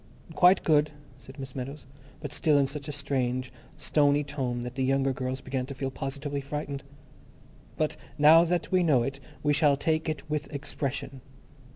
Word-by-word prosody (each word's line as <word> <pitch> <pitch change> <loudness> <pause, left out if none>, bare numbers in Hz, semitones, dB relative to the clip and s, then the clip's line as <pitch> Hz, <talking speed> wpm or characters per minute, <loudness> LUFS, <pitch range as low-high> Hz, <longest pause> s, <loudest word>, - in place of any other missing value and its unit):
"Quite 180 +3 +5
good," 150 -1 +4 0.3
said 135 +1 -13
Miss 135 -2 -8
Meadows, 135 +3 -6 0.4
but 145 -3 -5
still 150 -2 +3
in 140 - +4
such 140 +1 -5
a - - -3
strange, 130 -3 -2 0.2
stony 145 -1 +3
tone 130 -4 -3
that 125 0 -5
the 130 +1 -1
younger 135 0 +2
girls 130 0 -3
began 130 -1 -3
to 140 - -7
feel 135 0 -3
positively 140 +2 -4
frightened. 140 -1 -5 0.9
"But 155 -1 0 0.2
now 155 +3 +8
that 175 +1 -1
we 185 -1 +4
know 145 -8 +4
it, 135 +3 -4 0.2
we 145 0 +3
shall 145 -2 +4
take 160 +2 0
it 155 0 -4
with 150 0 -3
expression. 140 -2 -4
140 Hz, 175 wpm, -28 LUFS, 135-150 Hz, 0.9 s, now